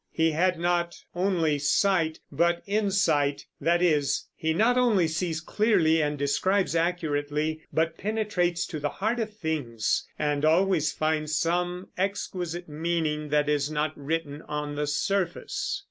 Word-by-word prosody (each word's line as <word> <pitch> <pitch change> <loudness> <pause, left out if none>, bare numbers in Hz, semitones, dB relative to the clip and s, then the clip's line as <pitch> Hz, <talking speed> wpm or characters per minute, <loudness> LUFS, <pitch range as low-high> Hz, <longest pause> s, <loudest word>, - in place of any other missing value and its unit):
He 160 0 +2
had 180 +3 +2
not 175 0 0 0.2
only 175 -5 +1
sight, 160 +2 +2
but 170 +4 +1
insight, 190 -9 +1 0.2
that 170 +4 +2
is, 150 -5 +2
he 160 - -1
not 220 +9 +3
only 225 -9 +3
sees 160 0 -2
clearly 165 -3 +2
and 150 -1 -1
describes 180 +6 +1
accurately, 155 -2 -1
but 165 +1 0
penetrates 205 -5 0
to 155 - -5
the 145 0 -1
heart 225 +8 -1
of 220 -1 -2
things 140 - -1
and 150 -1 0
always 165 0 +3
finds 155 0 0
some 175 +3 -1
exquisite 180 -3 -3
meaning 155 -1 -2
that 150 0 +2
is 145 -1 +1
not 155 0 -1
written 145 0 -3
on 150 0 -3
the 150 0 -1
surface. 200 - -1
165 Hz, 140 wpm, -27 LUFS, 150-180 Hz, 0.2 s, not